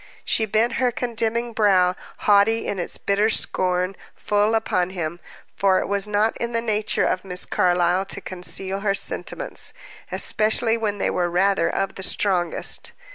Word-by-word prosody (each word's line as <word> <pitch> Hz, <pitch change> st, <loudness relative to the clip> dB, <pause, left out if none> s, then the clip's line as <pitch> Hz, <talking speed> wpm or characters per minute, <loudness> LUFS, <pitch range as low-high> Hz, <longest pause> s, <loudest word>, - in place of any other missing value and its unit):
She 220 Hz, -, +1 dB
bent 220 Hz, +3 st, +1 dB
her 250 Hz, -1 st, +3 dB
condemning 235 Hz, 0 st, -2 dB
brow, 185 Hz, -4 st, +3 dB, 0.3 s
haughty 210 Hz, +2 st, +3 dB
in 195 Hz, -, -3 dB
its 175 Hz, -, -2 dB
bitter 205 Hz, +2 st, +1 dB
scorn, 185 Hz, -2 st, 0 dB, 0.2 s
full 210 Hz, +2 st, +1 dB
upon 185 Hz, -5 st, 0 dB
him, 175 Hz, -2 st, -4 dB, 0.4 s
for 195 Hz, -1 st, +3 dB
it -, -, -3 dB
was 200 Hz, 0 st, +1 dB
not 210 Hz, +2 st, +1 dB
in 235 Hz, 0 st, -3 dB
the 230 Hz, -, +1 dB
nature 215 Hz, -2 st, 0 dB
of 185 Hz, -, -1 dB
Miss 180 Hz, -2 st, -4 dB
Carlyle 180 Hz, +1 st, +1 dB
to 195 Hz, -, -2 dB
conceal 190 Hz, +1 st, -2 dB
her 200 Hz, -1 st, 0 dB
sentiments, -, -, -2 dB, 0.4 s
especially 225 Hz, +1 st, +2 dB
when 215 Hz, -3 st, -2 dB
they -, -, 0 dB
were 175 Hz, -1 st, 0 dB
rather 185 Hz, 0 st, +2 dB
of 195 Hz, 0 st, -2 dB
the -, -, -9 dB
strongest. 185 Hz, -2 st, 0 dB
200 Hz, 160 wpm, -22 LUFS, 185-220 Hz, 0.4 s, her